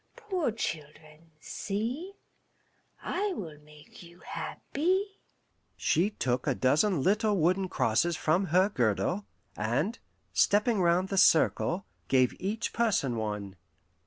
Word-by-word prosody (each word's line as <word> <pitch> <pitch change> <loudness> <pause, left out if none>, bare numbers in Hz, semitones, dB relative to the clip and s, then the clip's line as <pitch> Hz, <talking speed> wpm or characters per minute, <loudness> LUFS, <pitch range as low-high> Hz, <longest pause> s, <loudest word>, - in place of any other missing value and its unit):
Poor 380 - -1
children, 155 -5 -7
see, 235 - -4 0.9
I 395 +2 -1
will 160 - -7
make 150 0 -16
you 175 0 -15
happy." 380 +6 -2 0.6
She 180 +5 +2
took 125 - -2
a 135 - +2
dozen 150 +6 +2
little 210 +1 +2
wooden 185 +3 +1
crosses 160 +9 +1
from 175 +5 +1
her 185 +4 +4
girdle, 140 - 0 0.3
and, 135 - -1 0.3
stepping 210 0 +3
round 175 +2 +2
the 195 - +1
circle, 175 +1 +3 0.2
gave 130 -2 +3
each 210 +5 -2
person 195 - +1
one. 105 -3 -4
180 Hz, 115 wpm, -29 LUFS, 150-215 Hz, 0.9 s, her